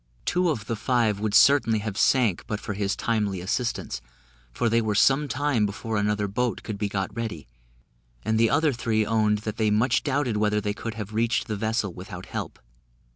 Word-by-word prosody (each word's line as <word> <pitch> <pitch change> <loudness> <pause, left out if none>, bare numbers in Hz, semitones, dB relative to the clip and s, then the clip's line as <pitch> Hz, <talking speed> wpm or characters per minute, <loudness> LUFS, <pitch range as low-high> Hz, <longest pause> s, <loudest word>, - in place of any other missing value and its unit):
Two 180 0 +2
of 110 -10 -2
the 115 - -2
five 110 -2 +1
would 105 -1 -1
certainly 140 -6 +5
have 105 -1 -4
sank 115 -3 +2
but 105 -3 -3
for 105 - -5
his 100 0 -1
timely 105 -5 -1
assistance, 95 - -2 0.5
for 115 - -1
they 115 +1 +3
were 110 -2 -1
some 135 +7 +4
time 140 -3 0
before 110 +2 -4
another 105 0 0
boat 120 +4 -2
could 105 -3 -5
be 105 -1 -1
got 95 -2 -3
ready; 110 - -5 0.8
and 110 0 +1
the 115 0 +4
other 150 -1 +2
three 110 -2 0
owned 110 -1 +2
that 110 - -4
they 110 -1 +2
much 110 +5 +2
doubted 140 -6 0
whether 105 0 +2
they 105 0 -2
could 110 +1 -6
have 105 -1 -6
reached 115 0 +1
the 110 - -3
vessel 110 -2 -1
without - - -8
help. - - -5
110 Hz, 195 wpm, -25 LUFS, 105-120 Hz, 0.8 s, certainly